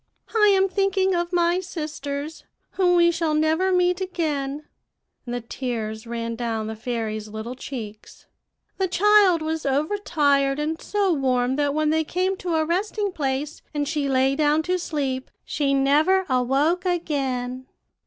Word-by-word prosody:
"'I 420 -1 +5
am 380 0 +3
thinking 385 0 +1
of 345 0 -1
my 345 0 +2
sisters, 305 -4 -5 0.3
whom 360 -2 +2
we 340 0 +5
shall 330 -2 0
never 320 +5 +2
meet 360 0 +2
again;' 300 -6 -2 0.6
and 240 - -3
the 245 - -3
tears 225 -2 -4
ran 230 0 -3
down 225 -2 -2
the 220 +1 -5
fairy's 220 -2 -4
little 220 +3 -6
cheeks. 225 -5 -9 0.5
'The 380 - +2
child 380 -2 +4
was 315 0 -2
overtired, 285 -2 +1
and 310 +2 -2
so 400 -3 +1
warm 255 -3 +1
that 290 -1 +1
when 310 0 +2
they 320 0 +2
came 370 +4 -1
to 350 -3 -2
a 315 0 +2
resting 400 +4 -1
place, 285 -1 -3
and 290 -1 0
she 295 -2 -1
lay 265 +1 +2
down 300 +1 +2
to 365 +2 0
sleep, 275 -6 -3 0.2
she 285 -2 0
never 300 +8 +3
awoke 275 +7 +1
again. 265 -8 -2
300 Hz, 155 wpm, -24 LUFS, 260-355 Hz, 0.6 s, I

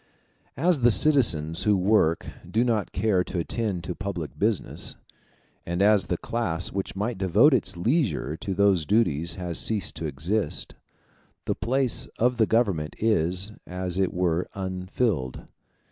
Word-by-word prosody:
As 165 0 +2
the 120 - +6
citizens 100 - +3
who 105 0 +3
work 90 -4 +2 0.2
do 115 +2 +2
not 115 -5 0
care 100 -5 +1
to - - -5
attend 95 0 -2
to 90 - -4
public 95 -5 -5
business, 105 -1 -1 0.7
and 85 +1 -3
as 105 0 +4
the 90 - -1
class 90 -7 -2
which 95 0 -4
might 105 +2 -3
devote 95 - +4
its 115 -7 0
leisure 95 - 0
to 95 +2 -4
these 95 -6 +3
duties 85 -7 +1
has 90 -3 -2
ceased 105 -3 0
to 80 - -3
exist, 85 +10 -2 0.7
the - - 0
place 130 -1 0
of 125 +1 +2
the 110 -2 +3
Government 100 -10 0
is, 95 -2 +1 0.2
as 90 0 -3
it 95 -2 +1
were, 90 -1 0
unfilled. 95 - -2
95 Hz, 145 wpm, -25 LUFS, 85-110 Hz, 0.7 s, the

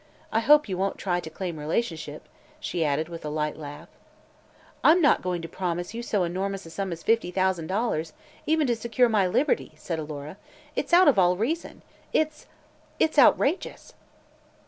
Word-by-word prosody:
I 220 - +2
hope 295 +4 +5
you 185 -2 -3
won't 195 +1 -1
try 175 -2 -1
to 160 - -7
claim 175 -2 -5
relationship," 155 -2 -3 0.3
she 175 - -2
added 150 +1 0
with 170 -1 -8
a 150 - -3
light 150 0 -2
laugh. 150 +2 -9 1.0
"I'm 330 +3 +6
not 295 -5 +4
going 180 -2 -3
to - - -4
promise 175 +2 -3
you 235 - -4
so 210 -5 0
enormous 190 +2 -3
a 165 - -11
sum 195 +2 -3
as 165 -1 -6
fifty 225 -5 +2
thousand 185 -3 0
dollars, 185 -6 -1 0.3
even 315 0 +3
to 240 -3 +1
secure 235 +2 +1
my 205 -4 +3
liberty," 270 +10 0
said 165 -2 -4
Alora. 150 +2 -7 0.4
"It's - - -2
out 355 +1 +7
of 260 -9 +5
all 180 0 +4
reason 300 - -3 0.3
it's 310 -1 0 0.5
it's 310 -2 +2
outrageous!" 340 - +2
185 Hz, 175 wpm, -26 LUFS, 165-235 Hz, 1.0 s, out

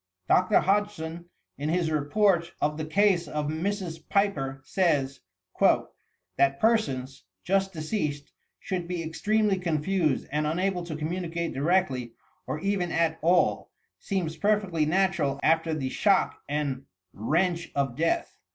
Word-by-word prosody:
Dr. 185 0 +4
Hodgson, 175 -4 -1 0.3
in 145 +2 -2
his 170 -1 +1
Report 170 +3 +2
of 150 +1 0
the 155 0 -4
case 185 0 +2
of 150 0 -2
Mrs. 175 0 -3
Piper, 145 -10 0
says: 140 -6 +1 0.4
■'That 90 +10 0
persons, 135 - 0 0.2
just 195 +1 +1
deceased, 155 -4 -3 0.3
should 180 -2 -3
be 175 -2 -3
extremely 205 +4 +1
confused 165 -2 0
and 150 +1 0
unable 180 +3 0
to 160 -3 -5
communicate 170 +1 -3
directly 135 -6 0 0.3
or 150 - -3
even 195 -3 0
at 165 -1 +1
all, 175 +3 +2 0.3
seems 175 -5 -2
perfectly 195 -5 +1
natural 170 -6 +1
after 160 +1 +3
the 140 -4 -2
shock 195 +7 +2
and 140 -2 -2 0.3
wrench 170 - 0
of 135 -3 0
death. 165 - 0
165 Hz, 125 wpm, -27 LUFS, 150-190 Hz, 0.4 s, Dr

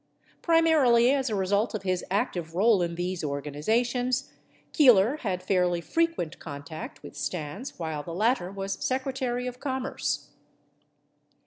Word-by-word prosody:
Primarily 300 -8 +4
as 270 -2 +1
a 215 - -1
result 200 +4 +1
of 205 - -4
his 185 -2 -1
active 180 -5 -2
role 205 +1 +4
in 170 -1 -1
these 175 0 -3
organizations, 230 - -1 0.4
Keeler 250 - +6
had 190 -9 -3
fairly 180 -2 +2
frequent 330 - -1
contact 150 +1 -8
with - - -10
Stans 185 - -5
while 160 -3 -3
the 170 - -8
latter 215 -2 +1
was 195 0 -4
Secre 265 +1 -1
tary 250 -1 -2
of 250 0 -5
Commerce. 265 -1 -3
205 Hz, 135 wpm, -27 LUFS, 175-255 Hz, 0.4 s, Keeler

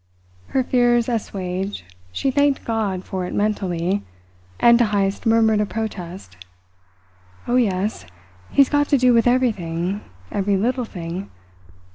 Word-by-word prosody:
Her 265 - 0
fears 240 -2 +2
assuaged, 195 - -3 0.3
she 270 - -1
thanked 285 0 +1
God 210 -5 -1
for 185 -2 -4
it - - -5
mentally, 195 -3 0 0.6
and 235 0 +6
to 240 - +5
Heyst 200 +1 -1
murmured 220 -1 +4
a - - +1
protest: 185 - -6 1.1
"Oh, 245 - +2
yes! 200 - 0 0.4
He's 275 -1 +5
got 290 -1 +2
to 285 - +4
do 250 -1 +4
with 230 +1 +4
everything 200 -7 0 0.3
every 200 0 +1
little 245 +5 0
thing. 180 -1 -6
210 Hz, 130 wpm, -21 LUFS, 185-240 Hz, 1.1 s, and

